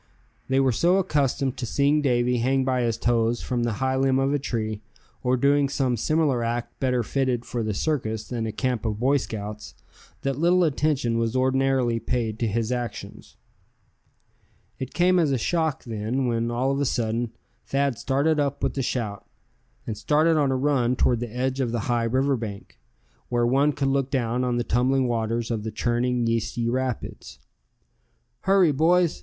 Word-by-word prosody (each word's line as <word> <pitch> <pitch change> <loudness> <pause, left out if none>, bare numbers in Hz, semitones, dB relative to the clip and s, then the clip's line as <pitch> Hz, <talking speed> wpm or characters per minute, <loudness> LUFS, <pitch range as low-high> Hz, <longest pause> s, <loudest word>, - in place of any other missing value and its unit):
They 135 0 +2
were 135 -1 +3
so 175 +10 +3
accustomed 140 -7 0
to 125 - -3
seeing 145 +5 +2
Davy 125 -2 +2
hang 130 +2 +1
by 130 -1 +1
his 115 -2 0
toes 115 0 +1
from 125 -1 -1
the 120 -1 0
high 130 +5 -1
limb 135 0 +2
of 135 +1 +1
a 145 - +1
tree, 110 -5 -3 0.4
or 125 0 +1
doing 140 +2 +3
some 130 -3 0
similar 140 0 +1
act 120 +1 -3
better 125 -2 +1
fitted 125 -1 -1
for 120 - -3
the 110 -2 -2
circus 110 -6 -2
than 115 -3 -3
a - - -3
camp 125 +1 -2
of 110 -2 -2
Boy 135 +4 +3
Scouts, 105 -4 -6 0.5
that 135 0 -1
little 175 +2 +4
attention 140 -6 +1
was 115 +1 -1
ordinarily 130 -2 +2
paid 115 -3 -2
to 115 - 0
his 115 +2 -1
actions. 105 - -6 1.4
It 130 - -6
came 180 +1 +4
as 155 -4 +2
a 135 - +2
shock, 160 +2 -1
then, 115 +3 -2
when 115 -1 0
all 125 +3 0
of 140 +1 -1
a - - +1
sudden 115 -1 -1 0.4
Thad 140 -3 0
started 145 +3 +1
up 140 -1 -1
with - - 0
a - - +2
shout, 110 -5 -3 0.6
and 110 - -4
started 155 +9 +2
on 145 -3 +2
a 130 - +1
run 130 -3 +1
toward 120 -1 +2
the 120 -2 -5
edge 130 +2 -2
of 125 -3 0
the 120 -1 -1
high 120 +1 0
river 135 +4 +1
bank, 105 - -7 0.5
where 120 -1 +1
one 135 +5 +3
could 135 -1 -1
look 135 -1 0
down 125 -2 0
on 125 -1 0
the 120 - 0
tumbling 130 +2 +1
waters 115 0 -1
of 110 -2 -1
the 110 - -4
churning 120 +1 0
yeasty 115 0 -1
rapids. 125 - -3 1.1
"Hurry, 190 -4 +5
boys!" 165 +4 +2
125 Hz, 185 wpm, -25 LUFS, 115-135 Hz, 1.4 s, Hurry